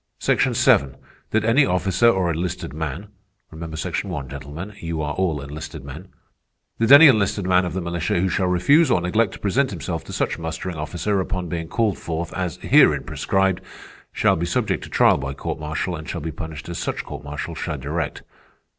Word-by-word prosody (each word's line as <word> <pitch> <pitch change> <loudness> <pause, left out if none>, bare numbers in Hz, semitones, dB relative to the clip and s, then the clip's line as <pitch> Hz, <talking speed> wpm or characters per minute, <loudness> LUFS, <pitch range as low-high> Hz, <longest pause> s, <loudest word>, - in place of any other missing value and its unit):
"'Section - - +1
Seven, 70 0 +3 0.3
that 110 0 +1
any 115 +6 +4
officer 90 +3 +3
or 95 -6 +1
enlisted 85 -2 -3
man'—remember 85 +1 -8
Section 90 +4 -3
One, 75 -6 -4
gentlemen, 75 +9 -8
you 85 -1 -4
are 75 -1 -2
all 85 -5 0
enlisted 70 -1 -8
men—'that 90 - -7
any 145 +3 +11
enlisted 105 -5 +2
man 90 0 +3
of 90 - -4
the 95 - -2
militia 85 -1 -2
who 95 - +2
shall 95 0 0
refuse 135 - +4
or 95 - +3
neglect 95 +4 +1
to - - -10
present 130 +7 +1
himself 85 -9 -4
to - - -9
such - - -1
mustering 80 +2 -4
officer 85 +6 -2
upon 90 -1 -3
being 85 -1 -3
called 110 0 0
forth 80 0 -4
as 90 -3 -3
herein - - +5
prescribed, 95 -1 0 0.5
shall - - +2
be 85 +2 -2
subject - - -1
to - - -12
trial - - +4
by 70 0 -4
court - - -4
martial, 80 +4 -3
and 80 +1 -8
shall 85 - -3
be 80 +2 -4
punished 80 0 -7
as 85 - -5
such - - -3
court 70 0 -8
martial 75 +3 -5
shall 80 -1 -4
direct. 75 +4 -4
85 Hz, 190 wpm, -22 LUFS, 80-95 Hz, 0.5 s, any